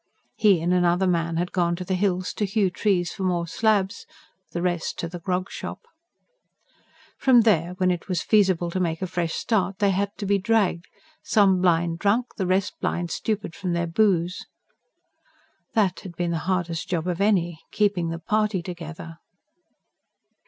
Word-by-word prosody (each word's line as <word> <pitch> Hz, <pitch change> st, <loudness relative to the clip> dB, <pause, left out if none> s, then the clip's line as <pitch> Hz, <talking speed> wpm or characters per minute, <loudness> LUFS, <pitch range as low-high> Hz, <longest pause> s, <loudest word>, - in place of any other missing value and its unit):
He 200 Hz, -6 st, +4 dB
and 175 Hz, +2 st, +1 dB
another 180 Hz, +1 st, +3 dB
man 170 Hz, -2 st, 0 dB
had 175 Hz, +1 st, -1 dB
gone 175 Hz, -2 st, +1 dB
to 180 Hz, +1 st, -6 dB
the 190 Hz, -, -2 dB
hills, 185 Hz, -1 st, 0 dB
to 210 Hz, -, -1 dB
hew 195 Hz, -1 st, +1 dB
trees 180 Hz, -3 st, 0 dB
for -, -, -8 dB
more 175 Hz, -2 st, 0 dB
slabs; 200 Hz, +1 st, 0 dB, 0.4 s
the 175 Hz, -, -3 dB
rest 175 Hz, -2 st, -1 dB
to 170 Hz, -, -3 dB
the 175 Hz, +1 st, -7 dB
grog 180 Hz, +2 st, -2 dB
shop. -, -, -6 dB, 1.4 s
From 255 Hz, -3 st, +6 dB
there, 180 Hz, -5 st, +2 dB
when 185 Hz, -1 st, +2 dB
it 175 Hz, -2 st, -4 dB
was 180 Hz, -2 st, -1 dB
feasible 185 Hz, -5 st, +2 dB
to 185 Hz, -, -2 dB
make 165 Hz, -1 st, -1 dB
a -, -, +1 dB
fresh 170 Hz, -2 st, -2 dB
start, 195 Hz, -4 st, 0 dB
they 200 Hz, -1 st, +2 dB
had 200 Hz, +2 st, 0 dB
to 205 Hz, -, -4 dB
be 200 Hz, 0 st, +2 dB
dragged, 200 Hz, -4 st, +1 dB, 0.3 s
some 195 Hz, -4 st, +3 dB
blind 170 Hz, -2 st, +2 dB
drunk, 225 Hz, +6 st, +1 dB
the 190 Hz, -4 st, -2 dB
rest 185 Hz, +1 st, 0 dB
blind 175 Hz, -1 st, -2 dB
stupid 210 Hz, -4 st, -2 dB
from 185 Hz, -3 st, -3 dB
their 170 Hz, 0 st, 0 dB
booze. 180 Hz, -1 st, +1 dB, 1.3 s
That 205 Hz, -5 st, +2 dB
had 180 Hz, -3 st, -10 dB
been 175 Hz, 0 st, -1 dB
the 165 Hz, -, -1 dB
hardest 175 Hz, -3 st, -1 dB
job 175 Hz, -2 st, -1 dB
of 180 Hz, +1 st, -2 dB
any: 175 Hz, -6 st, +1 dB
keeping 195 Hz, -5 st, +1 dB
the 165 Hz, -, -3 dB
party 210 Hz, +1 st, 0 dB
together. 165 Hz, -2 st, -8 dB
180 Hz, 175 wpm, -24 LUFS, 170-200 Hz, 1.4 s, From